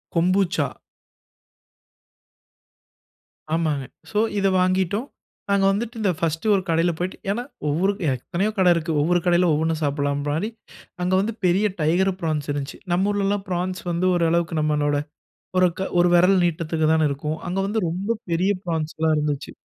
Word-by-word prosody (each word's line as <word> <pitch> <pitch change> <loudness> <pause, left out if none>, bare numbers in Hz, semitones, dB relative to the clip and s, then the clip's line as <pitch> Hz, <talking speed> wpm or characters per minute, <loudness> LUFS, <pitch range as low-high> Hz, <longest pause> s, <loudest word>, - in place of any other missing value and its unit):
Kombucha. 180 -3 +2 2.9
ஆமாங்க. 155 -5 0 0.3
So 210 - +1 0.2
இத 195 - +2
வாங்கிட்டோம். 190 +6 +1 0.4
நாங்க 200 -1 +3
வந்துட்டு 230 +4 -3
இந்த 195 - +2
பர்ஸ்ட் 165 +3 -1
ஒரு 195 - +1
கடையில 165 +1 +2
போய்ட்டு 180 +2 -3
ஏனா, 235 +4 -2 0.3
ஒவ்வொரு 180 +7 +1 0.2
எத்தனையோ 175 - -2
கடை 185 -2 +5
இருக்கு. 165 0 -2
ஒவ்வொரு 175 +3 +2
கடையில 175 0 +4
ஒவ்வொன்னு 160 +2 +1
சாப்பிடலானு 145 +5 -1 0.5
அங்க 180 - 0
வந்து 220 +3 -2
பெரிய 190 +4 +3 0.2
டைகர் 180 +5 +2
ப்ரான்ஸ் 155 -3 -2
இருந்துச்சி. 145 -1 -4
நம்ப 190 +4 +2
ஊர்லல்லாம் 200 0 0
ப்ரான்ஸ் 180 +1 -2
வந்து 170 +2 +1
ஒரு 170 - +2
அளவுக்கு 170 -2 0
நம்மளோட 150 -1 +1 0.6
ஒரு, 185 - +6 0.3
ஒரு 175 - +4
விரல் 180 +2 +5
நீட்டதிக்கு 160 -1 0
தானே 160 -1 +3
இருக்கும். 150 +3 -3
அங்க 185 - -2
வந்து 210 +3 -1
ரொம்ப 185 +6 -3 0.2
பெரிய 180 +4 +2
ப்ரான்ஸ்லா 160 -1 -1
இருந்துச்சு. 150 -2 -2
175 Hz, 140 wpm, -23 LUFS, 155-190 Hz, 2.9 s, ஒரு